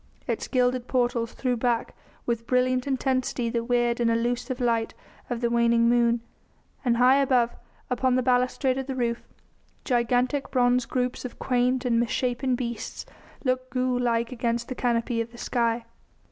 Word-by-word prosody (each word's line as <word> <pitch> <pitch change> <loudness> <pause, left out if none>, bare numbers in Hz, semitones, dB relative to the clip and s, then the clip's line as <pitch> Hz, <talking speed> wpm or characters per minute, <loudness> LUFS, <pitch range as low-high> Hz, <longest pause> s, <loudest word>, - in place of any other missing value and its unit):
Its - - -2
gilded 250 -1 +1
portals 240 -2 0
threw 250 -2 -1
back 235 0 0 0.3
with 235 -1 -2
brilliant 255 +1 +1
intensity 255 -3 0
the 235 0 -1
weird 240 0 +1
and 235 -1 +2
elusive 245 +2 -1
light 230 -2 0 0.3
of 240 -1 -3
the 235 - +1
waning 235 0 +3
moon, 235 -1 +3 0.6
and 240 -3 +2
high 255 +2 +6
above, 255 -4 +2 0.3
upon 250 0 +1
the 255 - +2
balustrade 255 +1 +1
of 265 - -5
the 265 - -3
roof, 235 -2 -1 0.6
gigantic 250 +2 +1
bronze 245 -1 +2
groups 250 -1 -2
of 250 - -7
quaint 250 0 +1
and 235 -2 +2
misshapen 250 +2 0
beasts 235 -2 -5 0.4
looked 255 -1 -1
ghoul 255 0 0
like 235 -1 0
against 235 -1 -2
the - - -2
canopy 235 -1 0
of 230 0 -6
the 240 - -13
sky. 235 -1 0
245 Hz, 160 wpm, -26 LUFS, 235-255 Hz, 0.6 s, high